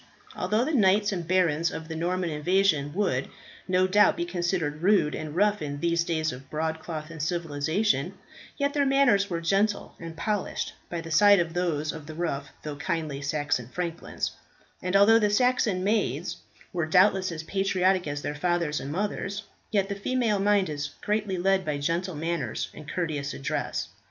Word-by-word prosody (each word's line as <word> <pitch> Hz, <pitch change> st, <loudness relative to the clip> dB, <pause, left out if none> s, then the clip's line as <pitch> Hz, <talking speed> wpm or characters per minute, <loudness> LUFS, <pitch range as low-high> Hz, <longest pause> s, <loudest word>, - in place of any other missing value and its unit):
Although 215 Hz, +6 st, +1 dB
the 315 Hz, -, -2 dB
knights 205 Hz, -3 st, +4 dB
and 175 Hz, -4 st, -4 dB
barons 170 Hz, -3 st, +2 dB
of 160 Hz, 0 st, -7 dB
the 160 Hz, -, -5 dB
Norman 175 Hz, +1 st, -1 dB
invasion 155 Hz, -2 st, +2 dB
would, 160 Hz, -10 st, 0 dB, 0.4 s
no 185 Hz, 0 st, +3 dB
doubt, 205 Hz, +3 st, +4 dB
be 170 Hz, -, -1 dB
considered 175 Hz, -4 st, -2 dB
rude 185 Hz, -5 st, +3 dB
and 155 Hz, -1 st, -5 dB
rough 205 Hz, +1 st, +2 dB
in 145 Hz, -1 st, -4 dB
these 170 Hz, +1 st, +1 dB
days 160 Hz, -2 st, -1 dB
of 130 Hz, +2 st, -10 dB
broadcloth 160 Hz, 0 st, -4 dB
and 160 Hz, -2 st, -7 dB
civilization, 165 Hz, +5 st, 0 dB, 0.4 s
yet 280 Hz, 0 st, 0 dB
their 285 Hz, -, +2 dB
manners 270 Hz, -8 st, +3 dB
were 170 Hz, -2 st, -1 dB
gentle 200 Hz, +5 st, 0 dB
and 165 Hz, -1 st, -8 dB
polished 205 Hz, +4 st, -2 dB, 0.2 s
by 170 Hz, -1 st, -3 dB
the 165 Hz, 0 st, -8 dB
side 200 Hz, +4 st, +6 dB
of 170 Hz, -1 st, -1 dB
those 160 Hz, -4 st, 0 dB
of 155 Hz, -2 st, -9 dB
the 155 Hz, -, -8 dB
rough 145 Hz, -4 st, -2 dB, 0.2 s
though 150 Hz, -1 st, -5 dB
kindly 150 Hz, -2 st, -2 dB
Saxon 145 Hz, -4 st, -1 dB
franklins; 170 Hz, +4 st, -4 dB, 0.5 s
and 185 Hz, +1 st, -1 dB
although 215 Hz, +3 st, +7 dB
the 210 Hz, -2 st, +2 dB
Saxon 215 Hz, -4 st, +2 dB
maids 175 Hz, -, 0 dB, 0.4 s
were 170 Hz, -3 st, -1 dB
doubtless 185 Hz, +2 st, +4 dB
as 160 Hz, -1 st, -5 dB
patriotic 190 Hz, -1 st, +1 dB
as 145 Hz, 0 st, -4 dB
their -, -, -2 dB
fathers 170 Hz, -1 st, 0 dB
and 140 Hz, -, -5 dB
mothers, 200 Hz, +2 st, -2 dB, 0.3 s
yet 200 Hz, -3 st, +1 dB
the 200 Hz, -, -2 dB
female 215 Hz, +1 st, 0 dB
mind 200 Hz, -1 st, +3 dB
is 145 Hz, -2 st, -3 dB
greatly 210 Hz, -2 st, 0 dB
led 190 Hz, +1 st, +2 dB
by 150 Hz, -3 st, -2 dB
gentle 170 Hz, +5 st, -1 dB
manners 155 Hz, -6 st, -2 dB
and 150 Hz, -1 st, -10 dB
courteous 150 Hz, -6 st, -2 dB
address. 150 Hz, +2 st, -2 dB
175 Hz, 175 wpm, -27 LUFS, 155-195 Hz, 0.5 s, although